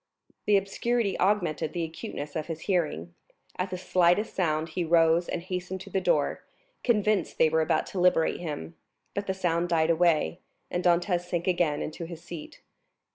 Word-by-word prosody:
The 205 -1 +6
obscurity 200 +1 0
augmented 175 -5 +1
the 175 - -1
acuteness 150 -2 -6
of 155 -2 -3
his 165 -1 -5
hearing; 155 - -1 0.5
at 185 +1 -1
the 185 - -4
slightest 180 +3 +2
sound 160 -3 0
he 180 - -2
rose 165 +1 +3
and 170 - -3
hastened 180 0 -4
to - - -10
the 190 - 0
door, - - +1 0.4
convinced 215 -5 +1
they 160 - +5
were 160 +1 +2
about 155 - +1
to 190 - -2
liberate 180 -2 +3
him, 145 - -5 0.4
but 200 0 -3
the 190 - -1
sound 175 -2 0
died 165 -1 +3
away, 160 - +2 0.3
and 175 - -1
Dantès 175 0 +2
sank 175 -1 -2
again 175 -5 +1
into 165 +2 -5
his 170 0 -9
seat. 170 -3 -9
175 Hz, 175 wpm, -28 LUFS, 160-185 Hz, 0.5 s, The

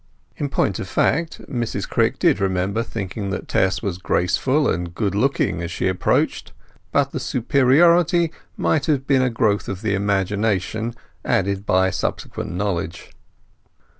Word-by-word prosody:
In 145 - -3
point 100 -7 0
of - - -5
fact 160 - 0
Mrs 120 -4 -3
Crick - - +1
did - - +3
remember 95 +3 0
thinking 100 -2 -4
that 100 - -4
Tess 95 +4 +1
was 95 -4 -3
graceful 130 - +1
and 85 +1 -2
good 100 -3 -1
looking 110 -5 +1
as 85 - -4
she 90 - -2
approached; 95 -1 0 0.4
but - - +2
the - - -3
superiority 160 +7 +3 0.3
might 150 -3 +1
have 140 -4 +1
been 135 -2 +3
a 130 - +2
growth 105 -3 0
of 100 +1 -5
the 105 -2 0
imagination 100 +3 0 0.3
aided 100 +1 0
by 95 0 +3
subsequent - - -3
knowledge. 85 -3 -3
105 Hz, 145 wpm, -21 LUFS, 95-130 Hz, 0.4 s, did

